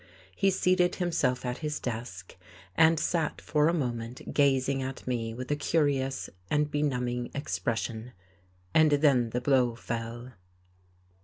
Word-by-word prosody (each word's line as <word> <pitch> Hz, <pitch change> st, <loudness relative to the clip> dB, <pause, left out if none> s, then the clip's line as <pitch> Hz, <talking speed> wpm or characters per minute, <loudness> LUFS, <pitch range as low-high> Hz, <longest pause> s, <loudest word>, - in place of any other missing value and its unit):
He 195 Hz, -, +3 dB
seated 180 Hz, -1 st, +2 dB
himself 135 Hz, -8 st, 0 dB
at 125 Hz, 0 st, -3 dB
his 150 Hz, -1 st, -3 dB
desk, 110 Hz, -7 st, -6 dB, 0.4 s
and 160 Hz, +4 st, +5 dB
sat 165 Hz, -2 st, -1 dB
for 150 Hz, 0 st, +2 dB
a -, -, +4 dB
moment 120 Hz, -4 st, -4 dB
gazing 135 Hz, -1 st, +2 dB
at 130 Hz, 0 st, -5 dB
me 115 Hz, -3 st, -2 dB
with 125 Hz, +3 st, -5 dB
a -, -, +3 dB
curious 140 Hz, -3 st, 0 dB, 0.2 s
and 150 Hz, 0 st, +1 dB
benumbing 125 Hz, -4 st, -1 dB
expression, 115 Hz, -, -3 dB, 0.6 s
and 155 Hz, -1 st, +6 dB
then 140 Hz, -5 st, +3 dB
the 125 Hz, +2 st, -2 dB
blow 125 Hz, -3 st, +2 dB
fell. 115 Hz, +2 st, -5 dB
130 Hz, 135 wpm, -29 LUFS, 120-150 Hz, 0.6 s, and